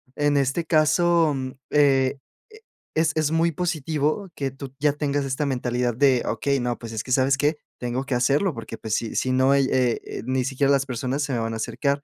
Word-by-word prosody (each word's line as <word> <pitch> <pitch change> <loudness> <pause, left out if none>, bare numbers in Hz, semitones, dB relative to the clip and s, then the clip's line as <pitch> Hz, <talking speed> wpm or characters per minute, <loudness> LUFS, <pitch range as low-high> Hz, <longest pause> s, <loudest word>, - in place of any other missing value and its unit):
En 145 0 +1
este 140 +5 0
caso, 160 0 +3
mm, 130 -1 -4 0.2
eh, 135 -2 +3 0.8
es 160 0 +2
es 155 -2 +1
muy 165 +1 +2
positivo 160 +2 -1
que 135 -1 -2
tú 135 0 -9
ya 145 0 +2
tengas 145 -1 -1
esta 135 +2 -1
mentalidad 125 -2 -1
de 130 -1 +3
okey, 140 -1 0
no, 120 0 -1
pues, 115 -1 -8
es 110 - -3
que 130 - -8
sabes 135 +1 +3
qué, 150 +2 +1 0.2
tengo 125 +1 -2
que 135 - -1
hacerlo 140 +9 +2
porque, 115 - -7
pues 110 0 -2
sí, 115 - -3
si 130 - 0
no 130 +1 +3
hay 140 -1 +4
eh, 125 -3 +1
eh, - - -6
ni 130 0 0
siquiera 135 +1 +1
las 135 -1 +2
personas 130 +2 -2
se 145 -2 -2
me 120 - 0
van 115 0 -2
a - - -3
acercar, 140 +5 -1
140 Hz, 215 wpm, -24 LUFS, 130-150 Hz, 0.8 s, hay